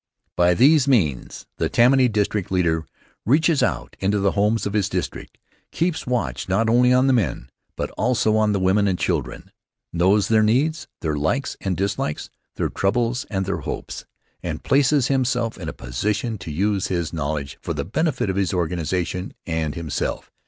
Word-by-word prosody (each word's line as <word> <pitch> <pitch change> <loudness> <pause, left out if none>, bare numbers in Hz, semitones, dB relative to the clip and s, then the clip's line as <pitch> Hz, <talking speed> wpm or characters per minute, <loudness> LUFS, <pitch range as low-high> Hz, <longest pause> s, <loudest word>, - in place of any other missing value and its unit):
By 90 0 +3
these 140 - +5
means 85 - 0
the - - 0
Tammany 130 +2 +5
district 105 -3 -1
leader 85 -4 0 0.4
reaches 155 +5 +3
out - - -1
into 100 +2 +1
the 100 -1 +2
homes 105 +2 +1
of 100 - -3
his 105 -3 +1
district, - - -5 0.3
keeps 170 -3 -1
watch 125 -5 -2
not 105 +5 +2
only 125 +1 +4
on 130 +1 +4
the 135 - +4
men, 85 - -1 0.3
but - - -3
also 110 -2 +1
on 110 -1 +3
the 100 - 0
women 95 +2 +2
and 95 -2 0
children; - - -3 0.4
knows 95 +4 +3
their 110 -1 +4
needs, 140 +9 +1
their 75 -2 -1
likes 100 - -1
and 95 -2 -2
dislikes, 100 -6 -2 0.2
their - - -1
troubles 120 +5 0
and 95 -2 -1
their 100 - -2
hopes, - - -6 0.4
and - - -5
places 140 -1 +3
himself 125 -4 0
in 80 -5 -5
a - - -3
position 105 - -3
to 80 - -7
use 100 +4 0
his 85 -3 -2
knowledge 70 -3 -3
for - - -4
the - - -3
benefit 140 - -1
of 95 - -1
his 95 -2 0
organization 90 +2 -2
and 80 -3 -2
himself. 85 -3 -3
100 Hz, 175 wpm, -22 LUFS, 90-125 Hz, 0.4 s, these